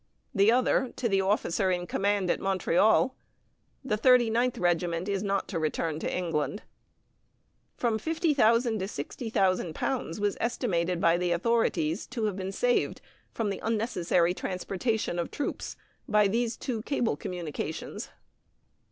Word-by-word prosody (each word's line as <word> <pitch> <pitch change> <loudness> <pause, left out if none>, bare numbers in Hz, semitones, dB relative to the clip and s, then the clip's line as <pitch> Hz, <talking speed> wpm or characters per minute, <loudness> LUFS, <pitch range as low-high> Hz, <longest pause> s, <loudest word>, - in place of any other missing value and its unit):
The 200 +3 +5
other, 255 +1 +2
to 245 - -1
the 195 -3 +2
officer 190 -1 +1
in 180 -1 0
command 200 0 +1
at - - -1
Montreal: 195 +6 +2 0.7
"The 215 -5 0
Thirty 245 0 +5
ninth 245 +2 +1
Regiment 175 0 0
is 200 -1 -1
not 200 -1 -1
to 170 - -2
return 155 0 -1
to - - -2
England." 170 +2 -2 1.1
From 230 -3 0
£50,000 320 +4 0
to 220 - +7 0.3
£60,000 190 - -1
was 205 -1 0
estimated 180 -7 0
by 170 0 +4
the 180 0 0
authorities 175 -3 +1
to 245 -3 -4
have 210 -3 -1
been 190 0 -4
saved, 245 +5 +1 0.4
in 220 -2 +1
the 195 - -4
unnecessary 180 -6 +1
transportation 190 +1 -2
of 170 - -2
troops, 290 - -4 0.3
by 210 -1 +4
these 230 +3 -1
two 235 -4 -3
cable 240 - 0
communications. 160 -2 -5
195 Hz, 135 wpm, -28 LUFS, 175-230 Hz, 1.1 s, to